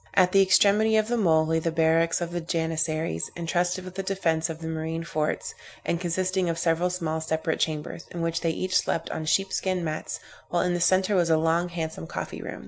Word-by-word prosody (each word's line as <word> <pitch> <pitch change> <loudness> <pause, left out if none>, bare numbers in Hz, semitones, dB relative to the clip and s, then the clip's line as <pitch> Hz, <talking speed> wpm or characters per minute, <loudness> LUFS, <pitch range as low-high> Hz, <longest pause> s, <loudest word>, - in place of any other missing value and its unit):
At 185 -2 +5
the 195 - +6
extremity 205 +3 +4
of 215 +1 +1
the 240 - +1
mole, 160 -8 +3
lay 160 +1 +1
the 165 - -1
barracks 165 +1 +2
of 170 0 -3
the 175 0 -2
Janissaries, 160 - -1
entrusted 175 +2 -1
with 185 - -8
the 195 - -3
defence 170 -4 0
of 160 - -4
the 165 0 -7
marine 160 +1 -3
forts, 155 -2 -2 0.3
and 170 - -1
consisting 185 +1 0
of 165 - -1
several 165 +1 +1
small 165 -3 -2
separate 160 0 -1
chambers, 155 +1 -3
in 170 -1 -4
which 165 0 -1
they 165 - +1
each 185 +3 -2
slept 165 - +1
on 155 - -4
sheepskin 190 +1 0
mats, 155 -1 -4 0.3
while 175 - +1
in 180 -1 +1
the 175 - -1
centre 190 +3 +3
was 175 -2 +3
a 165 +2 +2
handsome 160 - -5
coffee - - -5
room. - - -6
165 Hz, 210 wpm, -26 LUFS, 160-185 Hz, 0.3 s, the